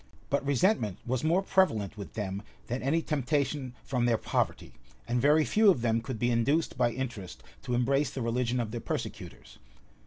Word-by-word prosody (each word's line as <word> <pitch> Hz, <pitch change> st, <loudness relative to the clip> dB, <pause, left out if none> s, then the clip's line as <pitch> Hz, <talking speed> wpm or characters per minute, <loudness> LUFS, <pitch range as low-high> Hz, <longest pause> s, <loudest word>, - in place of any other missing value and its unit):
But 140 Hz, 0 st, +1 dB
resentment 140 Hz, -, +1 dB
was 125 Hz, 0 st, -1 dB
more 170 Hz, +5 st, +2 dB
prevalent 110 Hz, -, +2 dB
with 100 Hz, -2 st, -9 dB
them 100 Hz, -2 st, -3 dB, 0.2 s
than 120 Hz, +3 st, -3 dB
any 160 Hz, +5 st, +1 dB
temptation 140 Hz, -2 st, -1 dB
from 125 Hz, -2 st, 0 dB
their 115 Hz, -2 st, +3 dB
poverty; -, -, -2 dB, 0.3 s
and 120 Hz, 0 st, 0 dB
very 150 Hz, +3 st, +4 dB
few 215 Hz, -1 st, +4 dB
of 170 Hz, -11 st, +3 dB
them 115 Hz, -1 st, +2 dB
could 120 Hz, 0 st, -5 dB
be 120 Hz, +2 st, +1 dB
induced 140 Hz, +8 st, +1 dB
by 125 Hz, -2 st, +2 dB
interest 115 Hz, -8 st, -6 dB, 0.2 s
to 125 Hz, -, -2 dB
embrace 135 Hz, +4 st, +2 dB
the 130 Hz, -, -4 dB
religion 120 Hz, +1 st, 0 dB
of 115 Hz, -3 st, -2 dB
their 120 Hz, 0 st, -4 dB
persecutors. -, -, -6 dB
125 Hz, 180 wpm, -29 LUFS, 115-145 Hz, 0.3 s, very